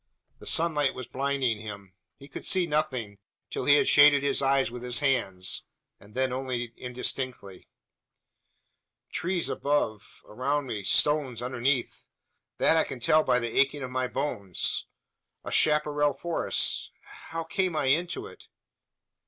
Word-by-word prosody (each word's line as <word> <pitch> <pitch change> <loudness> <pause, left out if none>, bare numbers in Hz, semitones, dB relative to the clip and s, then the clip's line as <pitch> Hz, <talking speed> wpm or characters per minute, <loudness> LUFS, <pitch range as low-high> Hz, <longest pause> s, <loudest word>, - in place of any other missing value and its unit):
The - - -11
sunlight 150 -4 +2
was 130 - -6
blinding 135 -4 -1
him. 100 -3 -9 0.2
He 140 - -14
could - - -8
see 185 -2 +3
nothing, 130 -10 -2 0.3
till - - -3
he 145 - +6
had - - +3
shaded 145 -1 +7
his 140 - +1
eyes 135 -2 +2
with 120 0 -7
his 125 0 -1
hand; 115 -10 0 0.5
then 125 +5 -2
only 125 -2 -3
indistinctly. 125 -5 -4 1.4
"Trees 180 0 -1
above 140 -7 -2
around 140 +6 -2
me! 110 -5 -5
Stones 145 -1 +2
underneath! 125 +1 -1 0.5
That 160 - +4
I 160 - +4
can 130 - -7
tell 155 +6 +4
by 125 - +2
the 120 -2 -3
aching 140 +1 +2
of 125 - -6
my 130 0 -1
bones. 120 - -2 0.6
A - - -6
chapparal 150 -1 +2
forest! 170 +5 0 0.4
How 165 0 -3
came 185 0 -1
I 150 - 0
into 170 - 0
it? 440 - -14
135 Hz, 140 wpm, -27 LUFS, 120-150 Hz, 1.4 s, shaded